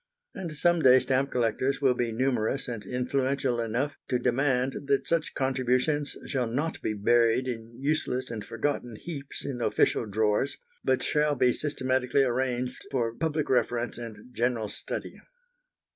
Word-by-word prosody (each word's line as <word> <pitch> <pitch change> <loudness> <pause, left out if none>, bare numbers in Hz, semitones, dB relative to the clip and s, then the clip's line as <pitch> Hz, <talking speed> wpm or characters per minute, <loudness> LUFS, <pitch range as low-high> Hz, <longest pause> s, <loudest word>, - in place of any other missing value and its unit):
And 165 -5 -6
some 175 +2 +3
day 130 -3 +8
stamp 135 +1 +1
collectors 125 +3 0
will 135 -3 +4
be 120 -1 -1
numerous 125 +2 0
and 115 -4 -5
influential 130 0 0
enough 120 +6 -1
to 125 - +1
demand 130 +1 +1
that 140 -1 +1
such 165 -2 0
contributions 130 +3 +1
shall 130 -4 -1
not 145 +8 -2
be 110 - -1
buried 115 +4 +3
in 115 -1 -5
useless 135 -3 -1
and 110 -3 -4
forgotten 120 -1 -2
heaps 140 +1 -7
in 130 -3 -4
official 115 - +2
drawers, 105 +5 +1 0.3
but - - +2
shall 150 -1 +2
be 125 -2 +3
systematically 130 -2 +1
arranged 125 0 -1
for 120 -4 0
public 155 +3 -1
reference 120 -2 0
and 115 +1 -9
general 115 -3 0
study. - - -6
125 Hz, 145 wpm, -28 LUFS, 120-140 Hz, 0.3 s, day